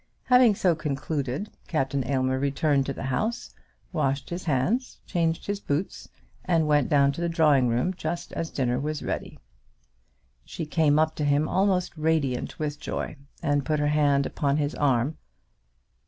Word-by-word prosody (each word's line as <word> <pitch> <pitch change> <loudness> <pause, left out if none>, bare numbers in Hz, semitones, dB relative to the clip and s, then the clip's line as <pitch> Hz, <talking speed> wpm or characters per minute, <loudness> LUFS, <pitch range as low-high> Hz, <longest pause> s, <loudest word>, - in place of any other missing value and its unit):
Having 250 -4 +5
so 180 -3 +3
concluded, 145 +2 -3 0.2
Captain 135 -3 0
Aylmer 130 -1 +1
returned 140 0 +1
to 140 - -2
the - - -7
house, 175 - -2 0.4
washed 140 -3 -1
his 175 +1 -4
hands, 175 - 0
changed 165 -3 -1
his 205 0 -2
boots, 150 +1 -3 0.3
and 165 -3 +2
went 150 -3 +2
down 140 -1 +4
to 145 - -6
the 170 - 0
drawing 150 -6 +4
room 125 +10 +1
just 175 -1 -5
as 165 - -3
dinner 125 -2 0
was 150 +1 -3
ready. - - -4 1.1
She 165 - -6
came 150 -1 +2
up 155 0 +2
to 150 - -1
him 145 +1 +2
almost 185 -2 +1
radiant 155 -5 0
with 145 -1 -3
joy, - - -4 0.3
and 145 -1 +1
put 155 +2 0
her 145 0 +1
hand 145 -2 +3
upon 140 -1 0
his 145 0 -1
arm. 135 +1 +1
150 Hz, 160 wpm, -26 LUFS, 140-165 Hz, 1.1 s, Having